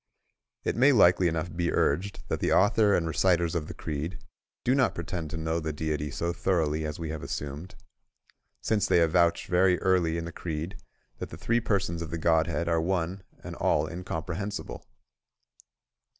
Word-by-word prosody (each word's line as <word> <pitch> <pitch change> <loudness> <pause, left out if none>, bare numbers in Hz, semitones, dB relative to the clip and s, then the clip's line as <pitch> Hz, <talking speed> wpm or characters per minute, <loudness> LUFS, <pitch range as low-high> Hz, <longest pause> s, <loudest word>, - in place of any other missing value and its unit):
It - - -1
may 135 +5 +5
likely 90 -5 +5
enough 80 0 -2
be 85 0 0
urged 90 +8 0
that - - -2
the - - 0
author 105 +1 +4
and 85 - +1
reciters 85 0 +2
cf 80 -3 -2
the - - -8
creed 80 +3 -4 0.5
do 125 - +3
not 135 -1 +2
pretend 85 -1 -4
to 80 - -5
know 80 +1 -1
the 80 -1 -3
Deity 75 -1 -2
so 85 +5 -2
thoroughly 80 -3 0
as 75 - -5
we 80 -2 -4
have 80 -2 -5
assumed, 75 +5 -6 0.9
since 105 -2 +1
they 90 - +4
avouch 85 +1 +3
very 90 0 +3
early 90 -3 +2
in 85 - -3
the 85 - -6
creed 85 +3 -5 0.4
that - - -5
the - - -9
three 115 +1 +1
persons 100 -7 -1
of 85 - -5
the 85 - -3
Godhead 85 +1 +1
are 85 -1 +2
one 90 +1 -1 0.2
and - - -7
all 75 - +1
incomprehensible. 90 +4 -5
85 Hz, 175 wpm, -28 LUFS, 80-95 Hz, 0.9 s, may